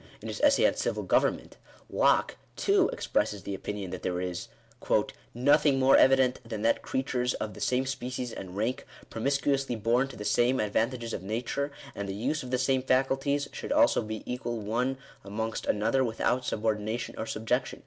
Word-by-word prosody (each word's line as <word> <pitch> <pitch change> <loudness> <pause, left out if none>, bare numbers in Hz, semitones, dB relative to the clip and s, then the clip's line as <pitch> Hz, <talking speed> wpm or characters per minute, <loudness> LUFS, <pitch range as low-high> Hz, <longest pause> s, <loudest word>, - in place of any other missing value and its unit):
In - - -7
his - - -5
essay - - +5
on - - +4
Civil - - -2
Government, - - +1 0.3
Locke, - - +2 0.2
too, 395 -2 +3
expresses 105 -2 -1
the 100 - -4
opinion 95 -1 -5
that - - -5
there 90 -1 -2
is 90 0 -4 0.4
" - - -1
nothing 145 +2 +4
more 135 0 +5
evident 130 -1 +5
than 110 -2 -5
that 115 - +2
creatures 125 -2 -1
of 105 -1 -4
the - - -11
same 130 +1 +1
species 125 -2 -4
and 95 0 -8
rank, 115 +5 -2 0.2
promiscuously 135 +2 0
born 120 +4 +2
to 135 - -10
the 105 - -7
same 120 +5 +2
advantages 115 +3 -1
of - - -3
nature, 120 +8 -2 0.2
and 100 -1 -5
the 95 - -3
use 135 +9 -1
of 125 - -7
the 130 - +1
same 130 0 +2
faculties, 135 +2 +1
should - - -6
also 290 - +4
be 110 -1 -5
equal 120 -1 -3
one 120 +5 -1 0.3
amongst 110 +3 -4
another 115 +6 +2
without 125 +1 0
subordination 110 +1 -2
or 110 - -4
subjection." 120 +4 -1
120 Hz, 180 wpm, -29 LUFS, 110-135 Hz, 0.4 s, essay